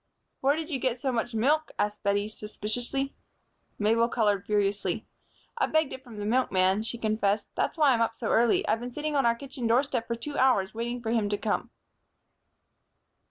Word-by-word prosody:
"Where 275 Hz, +2 st, +3 dB
did 320 Hz, +1 st, -5 dB
you 270 Hz, -, -1 dB
get 255 Hz, -1 st, 0 dB
so 265 Hz, +1 st, 0 dB
much 240 Hz, -1 st, -2 dB
milk?" 300 Hz, +8 st, +2 dB
asked 210 Hz, 0 st, -1 dB
Bettie, 200 Hz, +1 st, +1 dB
suspiciously. 225 Hz, +6 st, -3 dB, 0.6 s
Mabel 225 Hz, +3 st, +3 dB
colored 205 Hz, -5 st, +1 dB
furiously. 205 Hz, -1 st, 0 dB, 0.5 s
"I 425 Hz, -, +3 dB
begged 315 Hz, -2 st, +1 dB
it 260 Hz, -, -8 dB
from 235 Hz, -5 st, -11 dB
the 205 Hz, -, -4 dB
milkman," 200 Hz, -4 st, +2 dB
she 230 Hz, +2 st, -4 dB
confessed. 215 Hz, -2 st, 0 dB
"That's -, -, -1 dB
why 295 Hz, -3 st, +5 dB
I'm 235 Hz, -2 st, +2 dB
up 230 Hz, 0 st, +1 dB
so 225 Hz, -, -3 dB
early. 235 Hz, 0 st, +3 dB
I've 225 Hz, -, +2 dB
been 245 Hz, +1 st, -6 dB
sitting 300 Hz, +1 st, -2 dB
on 270 Hz, -4 st, +3 dB
our 235 Hz, -, +3 dB
kitchen 260 Hz, -1 st, -5 dB
doorstep 235 Hz, 0 st, +1 dB
for 235 Hz, -, -1 dB
two 285 Hz, +5 st, -5 dB
hours, 225 Hz, -8 st, +3 dB
waiting 240 Hz, +2 st, -3 dB
for 225 Hz, -, -1 dB
him 220 Hz, -3 st, +1 dB
to 205 Hz, -, 0 dB
come." 210 Hz, 0 st, -1 dB
230 Hz, 190 wpm, -28 LUFS, 210-260 Hz, 0.6 s, why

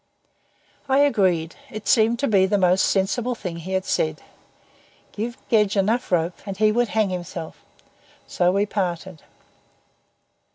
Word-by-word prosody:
I 265 Hz, -, +3 dB
agreed. 185 Hz, -, +1 dB
It 215 Hz, 0 st, -8 dB
seemed 230 Hz, 0 st, +4 dB
to 280 Hz, -, +1 dB
be 195 Hz, -3 st, +3 dB
the 205 Hz, -, +1 dB
most 185 Hz, 0 st, +3 dB
sensible 230 Hz, +6 st, 0 dB
thing 180 Hz, -6 st, -6 dB
he 180 Hz, +3 st, -6 dB
had 190 Hz, 0 st, -1 dB
said. 80 Hz, 0 st, -1 dB, 0.9 s
Give 235 Hz, +4 st, -5 dB
Gedge 210 Hz, -3 st, +2 dB
enough 215 Hz, +5 st, 0 dB
rope 170 Hz, 0 st, 0 dB
and 195 Hz, -2 st, -6 dB
he 215 Hz, +1 st, +3 dB
would 240 Hz, +2 st, +1 dB
hang 215 Hz, -3 st, 0 dB
himself. 175 Hz, -2 st, -7 dB, 0.6 s
So 180 Hz, 0 st, +1 dB
we 200 Hz, +2 st, +1 dB
parted. 185 Hz, -4 st, -4 dB
195 Hz, 140 wpm, -23 LUFS, 180-220 Hz, 0.9 s, seemed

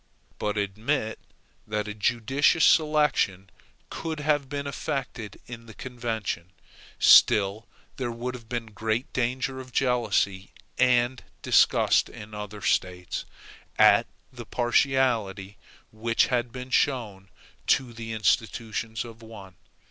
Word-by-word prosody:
But 105 Hz, 0 st, -2 dB
admit 110 Hz, +4 st, -2 dB, 0.5 s
that 105 Hz, 0 st, -2 dB
a 105 Hz, -, -4 dB
judicious 130 Hz, +9 st, +2 dB
selection 150 Hz, -, +2 dB, 0.4 s
could 160 Hz, -2 st, -4 dB
have 145 Hz, -2 st, 0 dB
been 140 Hz, -1 st, -4 dB
effected 135 Hz, -5 st, -5 dB
in 115 Hz, -1 st, -10 dB
the 110 Hz, -, -12 dB
convention, 110 Hz, -8 st, -4 dB, 0.4 s
still 105 Hz, +3 st, +5 dB, 0.3 s
there 125 Hz, -2 st, -2 dB
would 120 Hz, +2 st, -4 dB
have 115 Hz, -3 st, -11 dB
been 115 Hz, -3 st, -4 dB
great 110 Hz, +4 st, -2 dB
danger 130 Hz, +1 st, -1 dB
of 130 Hz, -1 st, -10 dB
jealousy 115 Hz, -7 st, 0 dB, 0.3 s
and 125 Hz, 0 st, +2 dB, 0.2 s
disgust -, -, +4 dB
in 105 Hz, +1 st, -11 dB
the 105 Hz, -, -8 dB
other 105 Hz, 0 st, -7 dB
States, 90 Hz, -1 st, -1 dB, 0.5 s
at -, -, +6 dB, 0.3 s
the 120 Hz, -2 st, -8 dB
partiality 120 Hz, -6 st, +1 dB, 0.3 s
which 115 Hz, +2 st, +1 dB
had 120 Hz, -1 st, 0 dB
been 125 Hz, +1 st, -8 dB
shown 110 Hz, -10 st, 0 dB, 0.4 s
to 130 Hz, -3 st, +2 dB
the 115 Hz, 0 st, -7 dB
institutions 110 Hz, 0 st, -1 dB
of 115 Hz, -1 st, -12 dB
one. 105 Hz, -4 st, -11 dB
115 Hz, 120 wpm, -26 LUFS, 105-130 Hz, 0.5 s, at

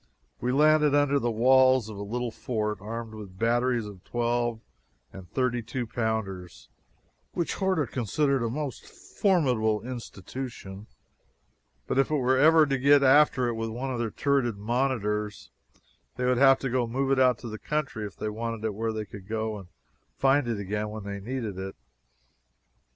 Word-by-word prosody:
We 125 Hz, -, -1 dB
landed 150 Hz, +1 st, +4 dB
under 145 Hz, -1 st, +3 dB
the 120 Hz, -, 0 dB
walls 130 Hz, +1 st, +4 dB
of 110 Hz, -, -8 dB
a 100 Hz, -, -7 dB
little 120 Hz, +3 st, -3 dB
fort, 105 Hz, -4 st, -3 dB
armed 115 Hz, +1 st, -6 dB
with 100 Hz, -4 st, -10 dB
batteries 120 Hz, +1 st, +1 dB
of 100 Hz, -3 st, -11 dB
twelve 120 Hz, -1 st, -1 dB, 0.5 s
and 95 Hz, -2 st, -11 dB
thirty 125 Hz, -2 st, 0 dB
two 120 Hz, +2 st, -4 dB
pounders, 95 Hz, -, -4 dB, 0.6 s
which 170 Hz, -, -1 dB
Horta 190 Hz, -6 st, 0 dB
considered 135 Hz, +3 st, 0 dB
a 115 Hz, -, -1 dB
most 140 Hz, +1 st, -4 dB
formidable 125 Hz, -, 0 dB
institution, 115 Hz, -3 st, -7 dB, 1.0 s
but -, -, 0 dB
if 135 Hz, -, +3 dB
we 155 Hz, -, +1 dB
were 130 Hz, -1 st, +2 dB
ever 160 Hz, +2 st, +6 dB
to 135 Hz, -2 st, -1 dB
get 140 Hz, +1 st, +5 dB
after 135 Hz, -2 st, +5 dB
it 120 Hz, -, -1 dB
with 115 Hz, 0 st, -3 dB
one 125 Hz, +4 st, -4 dB
of 120 Hz, -, -2 dB
our 115 Hz, -, -1 dB
turreted 135 Hz, -4 st, 0 dB
monitors, 105 Hz, -2 st, -2 dB, 0.6 s
they 125 Hz, +1 st, -2 dB
would 125 Hz, 0 st, +2 dB
have 135 Hz, -1 st, +7 dB
to 125 Hz, -2 st, 0 dB
move 135 Hz, +3 st, -1 dB
it 135 Hz, -, +3 dB
out 125 Hz, -3 st, +3 dB
in 120 Hz, -, -6 dB
the 110 Hz, -, -6 dB
country 150 Hz, -7 st, -3 dB
if 100 Hz, -, -13 dB
they -, -, -4 dB
wanted 115 Hz, 0 st, -4 dB
it 110 Hz, -, -1 dB
where 110 Hz, +2 st, -2 dB
they 110 Hz, -1 st, -4 dB
could 100 Hz, -1 st, -11 dB
go 110 Hz, -1 st, -2 dB
and 95 Hz, -, -12 dB, 0.5 s
find 135 Hz, -1 st, +3 dB
it 115 Hz, -2 st, -1 dB
again 105 Hz, +2 st, -3 dB
when 110 Hz, -1 st, -7 dB
they 100 Hz, 0 st, -5 dB
needed 110 Hz, -3 st, -4 dB
it. 95 Hz, 0 st, -6 dB
120 Hz, 175 wpm, -27 LUFS, 110-135 Hz, 1.0 s, have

